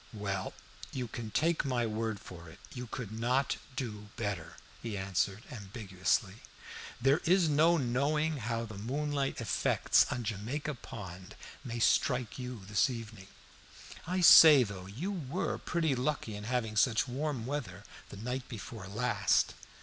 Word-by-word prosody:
"Well, 100 -3 -3 0.4
you 125 -2 -3
can 115 0 -6
take 165 +8 +1
my 125 -4 0
word 110 -1 -2
for 85 -4 -11
it, 80 - -13 0.2
you 125 -1 -6
could 115 -3 -6
not 125 +5 0 0.2
do 105 -5 -5
better," 105 -7 -4 0.2
he 110 -4 -4
answered, 95 +2 -1
ambiguously. 100 -2 -2 0.6
"There 135 +5 +4
is 180 0 +4
no 160 +3 +4
knowing 145 +4 +1
how 115 -1 -2
the 110 -3 -8
moonlight 140 +4 -2
effects 115 -5 +3
on 120 - -2
Jamaica 115 +8 -3
Pond 95 -5 -9 0.3
may 120 -3 -5
strike 125 +1 +2
you 125 -6 -6
this 105 +3 +2
evening. 110 -5 -7 0.8
I 185 +1 0
say, 155 -5 +10
though, 100 -4 -7
you 140 - -4
were 175 -2 -3
pretty 165 -4 0
lucky 130 -4 -2
in 105 0 -7
having 115 -2 -1
such 115 +1 +3
warm 135 -1 -3
weather 120 -9 -4 0.3
the - - -9
night 125 +4 -4
before 110 -3 -7
last." 105 -3 +1
115 Hz, 145 wpm, -32 LUFS, 105-135 Hz, 0.8 s, say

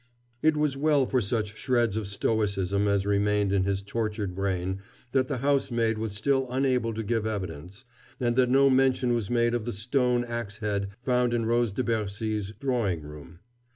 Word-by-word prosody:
It 155 -1 +3
was 150 -2 +1
well 145 -1 +3
for 125 0 +1
such 105 0 -2
shreds 120 -5 +1
of 110 -2 -2
stoicism 100 -1 0
as 100 -1 +1
remained 100 0 +1
in 95 -1 +2
his 100 0 -1
tortured 105 -2 -3
brain 95 0 -2 0.3
that 130 0 +2
the 140 - -2
housemaid 120 -4 +1
was 110 -2 -3
still 135 +5 +1
unable 125 -3 +1
to 110 - -3
give 110 0 -1
evidence, 95 - -6 0.3
and 120 -1 +1
that 125 -1 +3
no 135 +2 +5
mention 130 -2 +3
was 115 -5 -1
made 120 -1 +2
of 120 -3 -1
the 120 - -2
stone 125 +3 +1
ax 120 -4 -5
head 100 -3 -1
found 125 -1 +1
in 115 -1 0
Rose 120 -1 +2
de 120 +6 -2
Bercy's 105 -2 -2
drawing 115 - 0
room. 75 +4 -11
115 Hz, 180 wpm, -27 LUFS, 100-125 Hz, 0.3 s, no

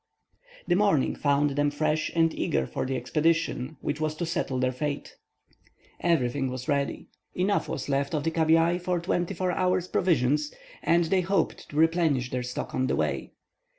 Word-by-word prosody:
The 175 - +3
morning 195 -8 +2
found 145 0 +2
them 145 +1 +1
fresh 155 +1 0
and 165 -1 +3
eager 65 -2 0
for 130 - -3
the 135 - -1
expedition 160 -2 0
which 145 +1 -3
was 155 0 -1
to 170 - -3
settle 150 -5 -2
their 130 0 +1
fate. 145 +3 -4 0.8
Everything 135 -5 +1
was 130 0 -6
ready. 140 -1 -1 0.3
Enough 195 +3 0
was 135 - -4
left 140 +2 0
of 150 - -1
the 165 - 0
cabiai 165 +2 +3
for 180 0 0
twenty 175 +2 -1
four 185 +1 0
hours' 180 0 +1
provisions, 150 -5 +1 0.3
and 170 +1 +3
they 185 +3 +2
hoped 190 +2 -1
to - - -10
replenish 160 -5 +2
their 125 - -1
stock 125 0 -5
on 130 0 0
the - - +1
way. 75 -1 -2
155 Hz, 175 wpm, -27 LUFS, 135-170 Hz, 0.8 s, The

